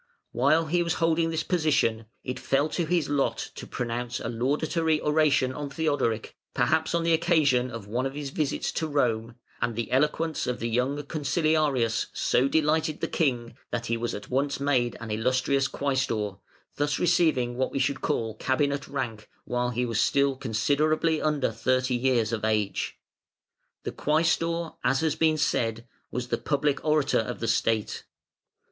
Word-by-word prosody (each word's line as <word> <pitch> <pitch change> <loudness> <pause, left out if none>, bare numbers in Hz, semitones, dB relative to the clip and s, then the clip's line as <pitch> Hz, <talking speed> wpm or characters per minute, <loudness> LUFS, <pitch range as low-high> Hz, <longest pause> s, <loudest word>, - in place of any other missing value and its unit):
While 140 +7 +3
he 175 +3 +1
was 170 -1 0
holding 165 0 +2
this 160 -1 -1
position, 140 -10 +1 0.2
it 125 -1 -4
fell 140 +3 +1
to 165 +1 -2
his 175 -2 +1
lot 145 -1 -1
to - - -9
pronounce 120 0 -3
a - - -4
laudatory 150 +6 0
oration 150 -4 +2
on 145 +1 -5
Theodoric 140 -7 -1 0.2
(perhaps 160 +1 +2
on 170 - +1
the 165 0 +3
occasion 155 -7 +3
of 115 -4 -7
one 120 +6 -1
of 135 - -8
his 145 -2 -5
visits 150 -1 -1
to 160 - -2
Rome), 120 -6 0 0.3
and 120 - 0
the 115 0 -3
eloquence 150 +4 +1
of 125 -1 -2
the 115 - -2
young 125 +5 0
Consiliarius 150 -5 +1
so 130 - +2
delighted 155 +1 +1
the - - -1
King, 125 -7 -1
that 120 0 -3
he 115 - 0
was 115 +1 -3
at 105 0 -8
once 140 +2 0
made 130 -4 +1
an 110 -2 -6
"Illustrious" 130 +5 +1
Quæstor, 130 -9 -1 0.4
thus 145 0 0
receiving 160 -9 +2
what 130 +1 -1
we - - -3
should 135 0 0
call 110 -1 -1
cabinet 140 +4 0
rank 120 -6 -4 0.2
while 125 0 -1
he 125 +1 -1
was 115 -3 0
still 140 -1 +2
considerably 150 +7 +1
under 150 -3 +1
thirty 130 0 0
years 120 -3 +1
of 110 - -2
age. 105 -2 -1 0.9
The - - -3
Quæstor, 165 +2 0
as 135 +4 +2
has 160 -2 +1
been 160 -1 +2
said, 115 -5 0 0.2
was 125 0 -4
the - - 0
Public 145 -1 0
Orator 150 -2 +2
of 110 - -3
the 115 - -2
State. 110 -1 0
135 Hz, 165 wpm, -27 LUFS, 120-155 Hz, 0.9 s, While